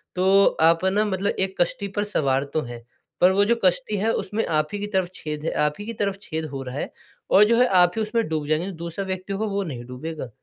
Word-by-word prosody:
तो 190 +2 +4 0.2
आप 165 +2 +5
है 190 - +3
ना 210 +2 +2
मतलब 200 0 0
एक 190 0 +1
कश्ती 200 +3 0
पर 205 - +2
सवार 140 -9 0
तो 155 - +1
हैं 120 -1 -9 0.4
पर 180 +1 +7
वो 200 +1 +3
जो 235 +3 +3
कश्ती 205 +4 +2
है 220 +3 +1
उसमें 210 +4 -2
आप 155 -1 +1
ही 205 - -3
की 205 - -3
तरफ 190 -3 0
छेद 150 0 -5
है - - 0
आप 150 - 0
ही 205 - -6
की 230 - -5
तरफ 200 -1 0
छेद 160 0 -3
हो 135 - -4
रहा 125 0 -7
है - - -4 0.4
और 200 - +7
जो 230 +2 +3
है 250 - +5
आप 175 - +5
ही - - +1
उसमें 225 +2 -1
डूब 155 -2 -2
जाएँगे 160 +5 0
दूसरा 170 +4 -4
व्यक्ति 190 +1 -4
होगा 205 +3 -2
वो 200 - 0
नहीं 135 -9 -6
डूबेगा। 130 +2 -6
185 Hz, 260 wpm, -23 LUFS, 155-205 Hz, 0.4 s, पर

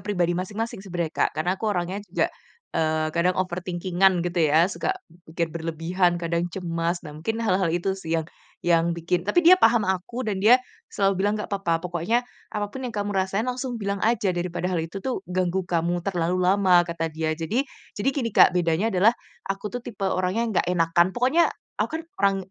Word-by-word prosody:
pribadi 180 -4 +1
masing-masing 205 +3 -4
sebenarnya 175 -4 -3
Kak, - - +1
karena 175 +4 0
aku 220 - -1
orangnya 185 0 -1
juga, - - +1 0.5
eee, 155 -1 +1
kadang 175 +2 +1
overthinking-an 180 0 +1
gitu 175 0 -1
ya, 160 +3 +5
suka 385 - -1 0.3
mungkin 165 +1 -1
berlebihan, 170 +2 0
kadang 170 +1 -1
cemas. 170 -1 -2
Nah 150 - -8
mungkin 225 +9 -3
hal-hal 190 -4 +2
itu 175 +3 0
sih 165 -3 -2
yang, 160 -1 -2 0.4
yang 170 0 +2
bikin 175 +2 -1
tapi 350 +9 +3
dia 360 +2 +9
paham 230 -2 +5
aku, 190 +7 -2
dan 200 -3 -1
dia 225 +5 +7 0.3
selalu 195 -1 +1
bilang 205 +1 +2
nggak 210 - -5
apa-apa, 170 -4 0
pokoknya 180 +8 0 0.3
apapun 210 +5 -3
yang 235 - -7
kamu 205 0 -2
rasain 195 +3 0
langsung 250 -1 -3
bilang 200 -1 -2
aja 220 -3 +2
daripada 175 0 -3
hal 175 - +1
itu 165 +4 -5
tuh 260 -7 -1
ganggu 185 +1 0
kamu 170 +1 0
terlalu 180 -2 0
lama 185 -1 +5
kata 165 -1 -3
dia. 155 0 -1
Jadi 205 - -1 0.3
jadi 205 - +1
gini 245 -5 -1
Kak, - - +6
bedanya 175 +4 +1
adalah 195 +5 +5 0.4
aku 195 +2 -3
tuh 245 - -3
tipe 200 -4 -5
orangnya 185 +4 0 0.2
nggak - - -5
enakan 170 0 +3
pokoknya 265 +8 +3 0.3
aku - - +1
kan - - -10 0.2
orang 200 -1 +3
185 Hz, 185 wpm, -25 LUFS, 170-205 Hz, 0.5 s, dia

